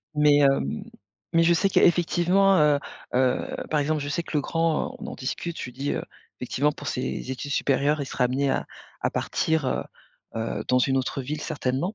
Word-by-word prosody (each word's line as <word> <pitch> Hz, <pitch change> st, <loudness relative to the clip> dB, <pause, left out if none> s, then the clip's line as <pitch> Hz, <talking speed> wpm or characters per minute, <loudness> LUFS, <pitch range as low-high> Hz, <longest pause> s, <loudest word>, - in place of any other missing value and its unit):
Mais, 150 Hz, -1 st, +5 dB
hem, 135 Hz, -, +2 dB, 0.5 s
mais 165 Hz, -, +5 dB
je 170 Hz, +1 st, +5 dB
sais 195 Hz, +4 st, +3 dB
qu'effectivement, 180 Hz, +2 st, +4 dB
heu 150 Hz, -1 st, +4 dB, 0.4 s
heu, 130 Hz, 0 st, +1 dB
par 150 Hz, -1 st, +2 dB
exemple 155 Hz, +1 st, 0 dB
je 145 Hz, -, -4 dB
sais 170 Hz, +4 st, -1 dB
que 155 Hz, -, -4 dB
le -, -, +3 dB
grand, 165 Hz, +2 st, 0 dB
on -, -, -7 dB
en -, -, -6 dB
discute, 165 Hz, +6 st, -4 dB
je -, -, -4 dB
lui 125 Hz, -, -9 dB
dis, 140 Hz, +3 st, -3 dB
heu, -, -, -2 dB, 0.4 s
effectivement 140 Hz, +4 st, 0 dB
pour 145 Hz, -2 st, -7 dB
ses 125 Hz, +1 st, -3 dB
études 130 Hz, +2 st, -5 dB
supérieures 145 Hz, +2 st, +1 dB
il 140 Hz, -, -3 dB
sera 125 Hz, -, 0 dB
amené 135 Hz, +2 st, +1 dB
à -, -, -1 dB, 0.4 s
à -, -, +1 dB
partir, 160 Hz, -4 st, 0 dB
heu, -, -, -1 dB, 0.5 s
heu, 115 Hz, +1 st, -3 dB
dans 125 Hz, -, +4 dB
une 135 Hz, +2 st, +2 dB
autre 135 Hz, +1 st, -1 dB
ville 150 Hz, +3 st, -4 dB
certainement. 145 Hz, -, -2 dB
145 Hz, 200 wpm, -25 LUFS, 130-165 Hz, 0.5 s, Mais